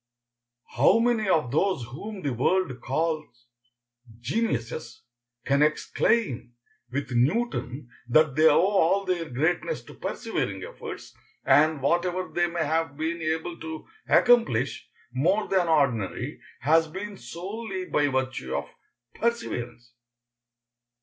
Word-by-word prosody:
How 145 - +6
many 230 -3 +1
of 150 -9 +2
those 185 -1 +1
whom 195 - -7
the 140 -3 -1
world 130 +1 0
calls 150 -3 -2 0.7
geniuses 120 - -3 0.4
can 140 +1 +2
exclaim 150 - +1 0.4
with 140 0 -3
Newton 130 - 0 0.2
that 155 +3 +4
they 155 +1 +6
owe 160 +3 +5
all 195 0 +2
their 175 -3 -1
greatness 160 - -1
to - - -13
persevering - - -3
efforts, - - -8 0.3
and 155 -2 +4
whatever 175 +4 0
they 175 0 +2
may 170 -2 -2
have 160 -1 -1
been 165 +2 -2
able 160 +2 -2
to 160 -1 -7 0.2
accomplish 185 - +3 0.2
more 180 +11 +1
than 185 -3 +2
ordinary 135 - 0 0.2
has 160 +3 +4
been 200 +5 -6
solely 190 - -6
by 145 -4 +1
virtue 130 -1 -2
of - - -2 0.5
perseverance? 125 - -3
160 Hz, 115 wpm, -26 LUFS, 130-190 Hz, 0.7 s, How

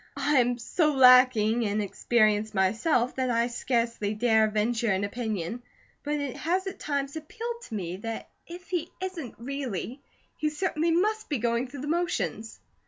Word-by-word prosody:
I 280 0 +3
am 245 0 +2
so 300 +5 +1
lacking 250 -3 +6
in 210 -1 0
experience 215 +1 +1
myself 230 - +2
that 260 -1 0
I 235 -1 +2
scarcely 235 -3 -1
dare 220 -1 +3
venture 220 +2 0
an 190 +1 0
opinion, 215 -1 -3 0.4
but 295 +1 -2
it 285 -3 -3
has 365 +4 0
at 385 - -6
times 280 -1 -2
appealed 455 +9 -6
to 225 - -7
me 180 -3 -4
that 225 +3 -5 0.2
if 350 +1 -10
he 350 -2 -2
isn't 370 - -5
really, 260 -1 -5 0.4
he 305 - 0
certainly 320 +1 -1
must 425 +6 +1
be 290 - 0
going 235 +2 0
through 265 +1 -9
the 290 - -5
motions." 330 - -2
250 Hz, 165 wpm, -27 LUFS, 220-305 Hz, 0.4 s, lacking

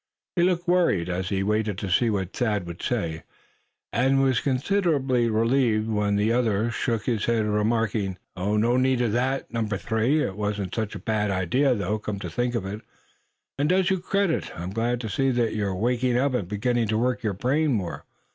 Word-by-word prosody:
He 175 - +2
looked 175 0 +1
worried 170 - +2
as 90 +1 -2
he 95 -1 0
waited 105 -1 0
to 100 - -4
see 115 +5 +3
what 95 -3 -2
Thad 105 -6 0
would 85 0 -8
say; 85 -11 -2 0.7
and 130 +4 +3
was 130 -3 +3
considerably 135 -3 +1
relieved 115 -1 +2
when 105 -1 +1
the 105 +3 +2
other 115 -2 +1
shook 115 -2 -1
his 115 -4 0
head, 115 -2 +1
remarking: 105 -2 0 0.2
"No 105 +6 +1
need 130 -1 +2
of 120 -3 +1
that, 130 +3 -1
Number 110 -3 -1
Three. 120 +9 +1
It 95 - -3
wasn't 105 -2 -3
such 110 -2 -2
a - - -9
bad 105 -2 0
idea 120 - +2
though, 105 +1 -1
come 105 -1 -4
to 90 -4 -6
think 120 +7 -1
of 105 -5 -2
it, 105 +3 -5 0.8
and 145 +2 +2
does 185 0 +3
you 190 - +1
credit. 195 -1 0
I'm 90 +2 -4
glad 115 +3 -1
to 115 - -4
see 135 +5 +1
that 120 -3 +1
you're 100 -3 -1
waking 120 +4 +1
up, 135 +1 +1
and 105 -8 -1
beginning 115 +4 0
to 110 +1 0
work 125 +2 0
your 105 -3 -1
brain 145 +9 +1
more. 95 -6 -3
115 Hz, 195 wpm, -25 LUFS, 105-130 Hz, 0.8 s, see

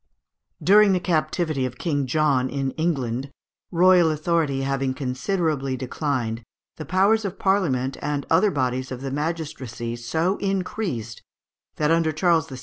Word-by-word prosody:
During 205 +1 +6
the 185 - +2
captivity 155 -4 0
of 130 0 -4
King 145 -6 -1
John 135 -2 +2
in 135 -1 -2
England, 135 -6 -2 0.4
royal 180 -1 +5
authority 155 -3 0
having 135 -1 -1
considerably 135 0 -1
declined, 125 -3 -2 0.4
the 155 - -6
powers 200 +5 +3
of 195 -1 -4
Parliament 140 -10 +1
and 145 -1 -2
other 210 - +4
bodies 130 -4 -2
of 130 0 -5
the 135 -1 -4
magistracy 145 -6 -4
so 160 - -1
increased, 185 - -3 0.5
that 150 +1 +1
under 165 -1 +3
Charles 165 0 +2
VI. 130 - -7
150 Hz, 140 wpm, -24 LUFS, 130-175 Hz, 0.5 s, During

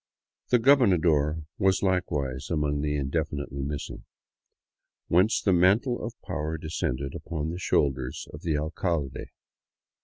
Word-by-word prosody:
The 125 - +5
gobernador 85 - +3 0.2
was 95 -1 +2
likewise 75 -8 -1
among 75 -3 0
the 75 0 -1
indefinitely 70 -1 -2
missing; 70 +2 -5 1.0
whence 95 +6 +4
the 95 - +2
mantle 100 +8 +3
of 115 +1 -6
power 80 -2 -3
descended 70 -4 -3
upon 80 -1 -4
the 85 - -5
shoulders 65 -6 0
of 75 - -9
the 80 -4 0
alcalde. 80 -2 -2
80 Hz, 120 wpm, -27 LUFS, 75-90 Hz, 1.0 s, The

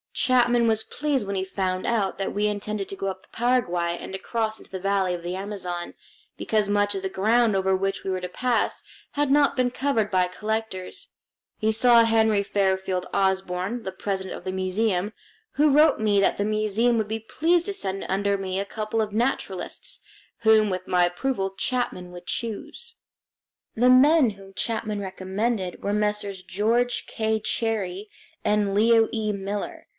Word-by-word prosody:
Chapman 240 -2 +3
was 220 -1 +1
pleased 285 -4 -1
when 200 0 -3
he 190 - -1
found 185 -1 -2
out 215 -5 0
that 195 - -3
we 210 +1 +1
intended 210 -1 -3
to - - -5
go 195 - -4
up 190 -1 -4
the - - -25
Paraguay 180 -9 0
and - - -8
across 220 +2 -2
into - - -16
the 190 - -5
valley 195 -1 +1
of 175 -1 -5
the 175 +1 -3
Amazon, 185 -3 -5 0.4
because 215 -2 0
much 205 0 +1
of 195 - -3
the 190 - -2
ground 220 +3 +2
over 190 0 +2
which 195 +1 -2
we - - -3
were 185 -1 -1
to 180 - -4
pass 245 +6 -1 0.3
had 290 -1 0
not 285 0 +4
been 250 -1 +1
covered 245 -5 0
by 185 -1 +3
collectors. 220 - -4 0.5
He 220 0 +2
saw 235 +1 +6
Henry 220 -2 +3
Fairfield 190 -2 0
Osborn, 190 +3 0
the 190 - -4
president 190 0 -4
of - - -10
the 185 - -3
museum, 190 +1 0 0.4
who 300 +1 +3
wrote 300 +1 +5
me 210 -2 +3
that 195 - +2
the 205 - 0
museum 215 +3 +1
would 220 -2 0
be 220 +1 -3
pleased 335 - +1
to 405 - -2
send 195 - -3
under 200 +1 +1
me 190 -1 -3
a 200 - -2
couple 215 +2 -2
of 210 -1 -3
naturalists, 240 - -2 0.4
whom, 220 -2 +4
with 185 -1 -4
my 180 -1 +3
approval, 195 +2 -1
Chapman 195 -4 -2
would 175 0 -11
choose. 250 - -5 0.8
The 245 +3 +4
men 265 0 +6
whom 195 -1 -14
Chapman 220 -1 -1
recommended 190 +1 -3
were 200 - 0
Messrs. 210 -2 -1
George 225 +6 0
K. 220 -1 -1
Cherrie 210 -3 -2 0.3
and 210 -1 +1
Leo 225 +1 +5
E. 215 -2 0
Miller. 200 0 -5
210 Hz, 175 wpm, -25 LUFS, 190-230 Hz, 0.8 s, saw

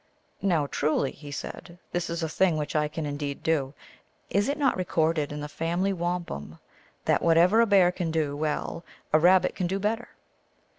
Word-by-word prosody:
" - - -41
Now, 170 -7 +2
truly," 140 -1 0
he 145 -1 -11
said, 170 +4 -7
" - - -40
this 175 -1 -2
is 170 0 -3
a - - 0
thing 170 +1 +2
which 150 0 -3
I 150 0 +2
can 155 +1 -5
indeed 145 -1 -4
do. 145 -4 0 0.6
Is 205 +5 +2
it 285 - -1
not 275 -4 +2
recorded 160 -4 0
in 150 0 -5
the 150 - -4
family 170 +6 -1
wampum 170 - -4 0.5
that - - +2
whatever 170 +7 +5
a 230 - +3
Bear 190 -4 +5
can 180 -2 -3
do 155 -3 -1
well 155 +2 -2 0.3
a 155 - +6
Rabbit 180 +3 +5
can 180 - -2
do 190 +2 -1
bet 210 +3 0
ter 240 - -12
165 Hz, 200 wpm, -27 LUFS, 150-185 Hz, 0.6 s, a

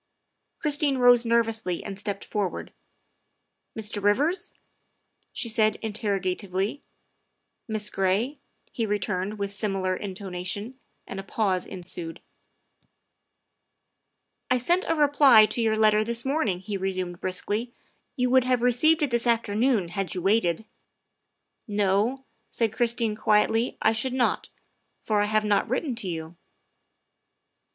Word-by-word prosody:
Christine 290 -2 +1
rose 245 -1 +5
nervously 225 -6 0
and 195 -1 -7
stepped 200 -1 -4
forward. 205 -4 -3 0.5
" - - -25
Mr. 210 -1 -4
Rivers?" 280 - +1 0.8
she - - -1
said 215 -1 +2
interrogatively. 200 +1 -2 0.4
" - - -51
Miss 215 -2 -2
Gray?" 200 +9 0 0.3
he 225 -2 -2
returned 205 0 -2
with 200 -1 -3
similar 195 -3 -1
intonation, 195 +5 -5 0.3
and 195 - -7
a - - -5
pause 195 -2 -1
ensued. 175 -3 -7 1.6
" - - -53
I 255 - +3
sent 345 +10 +1
a 330 - +1
reply 285 -7 +6
to 235 - -2
your 220 -1 +2
letter 215 0 +4
this 235 +2 -1
morning," 265 - 0
he 200 +1 -4
resumed 185 -2 -3
briskly; 205 +6 -1 0.2
" - - -46
you 250 -2 0
would 260 -1 +5
have 250 -2 +1
received 305 +6 +4
it 285 - 0
this 235 0 +1
afternoon 230 -3 +1
had 190 +2 -3
you 180 - -4
waited. 195 -1 +2 0.3
' - - -53
' - - -53
" - - -46
No," 210 +6 +1 0.2
said 225 -2 -1
Christine 235 -2 0
quietly, 220 +3 +2
" - - -45
I 220 - +5
should 225 +3 -1
not, 255 -2 0 0.5
for 210 -2 0
I - - +2
have 215 0 +1
not 205 -1 +1
written 260 +2 -1
to 210 - -5
you." 165 -1 -5
215 Hz, 145 wpm, -26 LUFS, 195-245 Hz, 1.6 s, reply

